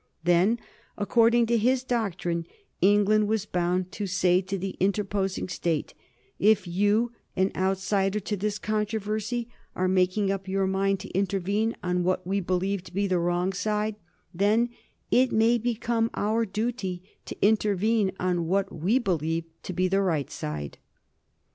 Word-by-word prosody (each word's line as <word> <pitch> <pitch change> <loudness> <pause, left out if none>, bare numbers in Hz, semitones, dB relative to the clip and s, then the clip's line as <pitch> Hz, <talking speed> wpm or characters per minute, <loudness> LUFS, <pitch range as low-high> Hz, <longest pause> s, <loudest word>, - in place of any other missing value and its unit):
Then, 175 +7 +3 0.4
according 230 +3 +4
to 230 0 +2
his 250 +3 +2
doctrine, 175 -9 -2 0.3
England 205 +2 +4
was 215 -1 0
bound 180 0 -1
to 205 0 -4
say 180 0 +3
to 195 +1 -4
the 195 +1 -4
interposing 195 -1 0
State: 170 -4 -2 0.5
"If 210 -1 +4
you, 205 +6 +1 0.2
an 190 +1 +2
outsider 195 +1 0
to 205 +1 -3
this 205 +1 -2
controversy, 215 +2 -2 0.3
are 185 - +1
making 185 +2 +2
up 195 -1 -4
your 195 0 0
mind 195 0 0
to - - -8
intervene 200 +3 0
on 180 0 0
what 185 0 0
we 195 +2 0
believe 185 +1 -1
to - - -11
be 200 +1 +1
the 185 -2 +1
wrong 175 +2 0
side, 210 +1 -1 0.4
then 210 +6 +2 0.4
it 255 0 +4
may 230 +2 +3
become 230 0 0
our 220 +2 +1
duty 200 -3 -3 0.2
to - - -7
intervene 210 -1 +2
on 175 -2 0
what 195 +2 0
we 180 +10 +1
believe 165 - 0 0.2
to - - -6
be 185 +1 +1
the 195 +2 +2
right 160 -8 0
side." 75 -1 -5
195 Hz, 150 wpm, -27 LUFS, 185-215 Hz, 0.5 s, according